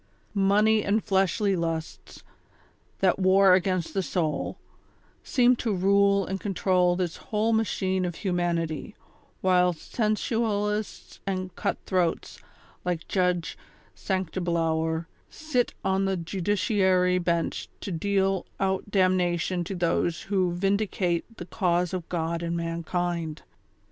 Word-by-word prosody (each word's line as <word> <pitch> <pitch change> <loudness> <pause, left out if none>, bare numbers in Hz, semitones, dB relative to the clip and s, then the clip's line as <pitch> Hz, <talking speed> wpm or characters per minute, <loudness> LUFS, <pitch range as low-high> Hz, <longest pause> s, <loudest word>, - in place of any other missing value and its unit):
Money 210 +2 +3
and 205 +2 +1
fleshly 195 0 +1
lusts, 165 -2 -4 0.8
that 190 0 +3
war 190 0 +5
against 185 -2 +1
the 195 - +1
soul, 155 -6 -2 0.7
seem 250 -1 +4
to 230 -1 -2
rule 200 +1 +3
and 190 0 -3
control 180 -2 +2
this 175 -2 -2
whole 220 +1 0
machine 190 -4 0
of 175 -2 -2
humanity, 170 -4 -2 0.5
whilst 180 -3 +2
sensual 215 -1 0
ists 210 0 -5
and 185 -2 -3
cut - - -1
throats, 180 -3 -1 0.4
like 175 -2 -2
Judge 180 -3 0 0.4
Sanctiblower, 165 -3 -1 0.2
sit 280 -6 -1
on 190 0 +2
tlie 185 -3 -2
judiciary 185 -1 +2
bench 170 -1 -1
to 195 - -5
deal 195 +1 0
out 190 +1 -1
damnation 185 -2 +1
to 190 +3 -5
those 170 -1 0
who 190 -3 +1
vindi 195 +4 0
cate 175 -3 -1
the 175 - -7
cause 180 -1 0
of 180 -3 -4
God 165 -1 -2
and 170 0 -2
mankind. 170 -1 -3
185 Hz, 120 wpm, -26 LUFS, 170-200 Hz, 0.8 s, war